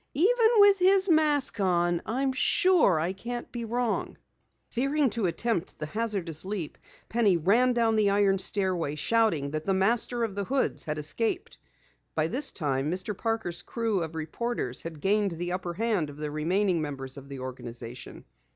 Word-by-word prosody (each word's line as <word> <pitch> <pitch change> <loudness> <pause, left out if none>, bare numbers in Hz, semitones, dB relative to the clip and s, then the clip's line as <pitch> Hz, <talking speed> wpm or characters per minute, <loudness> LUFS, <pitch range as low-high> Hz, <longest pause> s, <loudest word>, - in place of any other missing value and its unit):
"Even 445 - +4
with 405 -1 +6
his 380 +1 +4
mask 300 -7 +3
on, 175 -2 +1
I'm 260 +4 0
sure 310 - +3
I 170 +4 -1
can't 240 +5 -6
be 235 -1 -5
wrong!" 240 0 -2 0.5
Fearing 275 +1 +1
to 220 -4 -1
attempt 190 0 -2
the 155 - -4
hazardous 195 -4 -2
leap, 190 -5 -5 0.3
Penny 215 -6 +2
ran 230 +10 +3
down 230 -2 +2
the 210 -2 +3
iron 200 -1 +3
stairway, 185 -7 0
shouting 160 -5 +1
that 155 0 -3
the 195 +2 0
Master 230 +4 +1
of 220 -3 -2
the 200 0 -3
Hoods 270 +3 -1
had 150 0 -3
escaped. 155 +10 -2 0.6
By 155 0 +1
this 270 - 0
time, 140 -3 -1
Mr. 185 +3 -3
Parker's 220 -5 -2
crew 225 -5 -2
of 165 0 -5
reporters 160 - -3
had 160 -3 -8
gained 200 -1 +2
the 175 +2 -4
upperhand 180 -1 -1
of 145 - -11
the 150 -1 -4
remaining 175 +3 0
members 135 -3 -5
of 140 -1 -11
the 140 - -7
organization. 125 -2 -8
195 Hz, 165 wpm, -27 LUFS, 160-235 Hz, 0.6 s, with